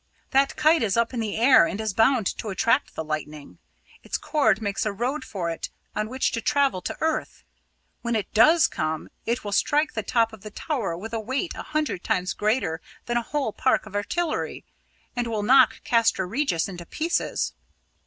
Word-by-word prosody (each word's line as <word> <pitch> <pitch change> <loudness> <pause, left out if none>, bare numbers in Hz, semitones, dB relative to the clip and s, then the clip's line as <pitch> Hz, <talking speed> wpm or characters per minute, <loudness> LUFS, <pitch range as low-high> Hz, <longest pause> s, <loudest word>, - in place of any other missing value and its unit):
That 275 +1 +3
kite 315 0 +4
is 220 -2 +1
up 235 +2 +1
in 245 - -2
the 215 -2 -2
air 240 -6 +6
and 195 - -4
is 220 -2 -2
bound 225 +1 +3
to - - -5
attract 230 +7 +1
the 160 - -3
lightning. 150 - -6 0.4
Its - - -3
cord 225 -10 +2
makes 200 -3 -2
a 215 - 0
road 245 +9 -2
for 175 -5 -3
it 165 - -5 0.3
on 215 +1 -1
which 260 +2 0
to 230 - -2
travel 275 -10 +1
to - - -5
earth. 320 0 -2 0.6
When 235 -1 -1
it 215 - -3
does 310 +10 +6
come, 155 0 -3 0.2
it 235 +1 0
will 205 - -4
strike 295 +9 +2
the 220 - -2
top 225 +1 +1
of 220 - -12
the 215 - -8
tower 210 - -3
with 220 +5 -8
a 225 - -1
weight 260 - -2
a - - -5
hundred 305 -11 -2
times 180 +1 0
greater 210 -7 0 0.2
than 240 - -2
a - - +2
whole 265 -2 -2
park 260 - +1
of 215 - -12
artillery, 305 +12 -2 0.5
and 245 -1 -1
will 220 -3 -2
knock 260 +4 +5
Castra 230 -5 +2
Regis 205 - 0
into 175 -3 -8
pieces. 330 +2 -1
225 Hz, 195 wpm, -25 LUFS, 195-265 Hz, 0.6 s, air